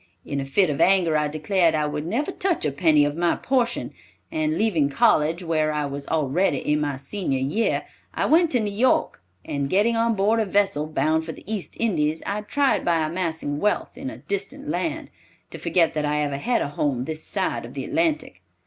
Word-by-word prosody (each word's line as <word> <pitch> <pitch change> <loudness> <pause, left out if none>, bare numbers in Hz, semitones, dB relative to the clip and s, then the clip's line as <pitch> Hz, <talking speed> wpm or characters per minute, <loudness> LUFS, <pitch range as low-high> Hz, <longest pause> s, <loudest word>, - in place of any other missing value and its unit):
In 140 - -3
a - - -4
fit 155 +5 +2
of 140 - -2
anger, 180 -4 +4
I 150 0 +2
declared 160 +3 +1
I 150 -1 +1
would 150 +1 -3
never 270 - -1
touch 365 - -1
a 150 - +1
penny 150 -1 +4
of 145 0 -2
my 170 +1 +1
portion, 245 -3 -1 0.4
and 315 -1 0
leaving 170 -10 +2
college, 155 +5 +2
where 155 -2 +1
I 150 -1 -1
was 140 0 -6
already 155 +1 +1
in 150 +3 0
my 145 -2 -2
senior 140 +1 -3
year, 145 +13 0 0.3
I - - -1
went 335 +2 +4
to 245 - +3
New 210 -2 -2
York, 235 - +1 0.2
and 140 -1 -2
getting 210 +7 +2
on 230 0 +2
board 210 +3 +2
a 220 - +1
vessel 195 -6 +1
bound 155 +1 +1
for 160 0 -6
the - - -13
East 210 -2 -4
Indies, 160 -8 0
I 205 +1 -2
tried 275 +6 +1
by 170 -2 +2
amassing 160 -3 -3
wealth 210 +3 0
in 270 - -5
a - - -9
distant 210 +9 -4
land, 325 0 -3 0.4
to - - -8
forget 170 -3 +2
that 150 - -1
I 150 0 0
ever 145 -1 -2
had 240 - 0
a - - -3
home 140 -3 -1
this 155 +1 -4
side - - -1
of - - -10
the - - -4
Atlantic. 320 -1 -1
165 Hz, 210 wpm, -24 LUFS, 150-220 Hz, 0.4 s, anger